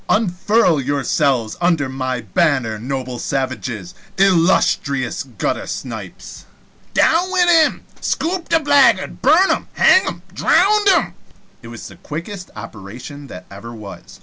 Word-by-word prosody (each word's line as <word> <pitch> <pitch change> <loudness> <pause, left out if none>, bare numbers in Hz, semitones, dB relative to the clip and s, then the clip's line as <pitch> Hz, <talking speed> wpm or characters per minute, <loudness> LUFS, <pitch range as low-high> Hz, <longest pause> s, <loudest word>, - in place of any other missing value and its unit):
Unfurl 195 -4 +2
yourselves 135 -3 0
under 170 -5 +1
my 130 -1 -3
banner, 115 - 0
noble 130 0 -5
savages, 130 - -4 0.2
illustrious 165 -8 +2
guttersnipes 120 -8 -6 0.2
" - - -34
"Down 350 +3 +3
wid 360 -1 +2
him!" 325 -3 +3 0.2
"Scoop 345 +1 -2
the 330 -1 +3
blaggard!" 280 -9 +3
"Burn 320 +8 +4
him!" - - -2
"Bang - - +5
him!" - - -5
"Dhround 415 +2 +3
him!" 385 - +2 0.5
It 115 - -12
was 115 -1 -9
the - - -14
quickest 180 +5 -7
operation 115 +6 -10
that 90 -6 -10
ever 115 +4 -10
was. 105 -3 -11
145 Hz, 125 wpm, -18 LUFS, -, 0.5 s, Bang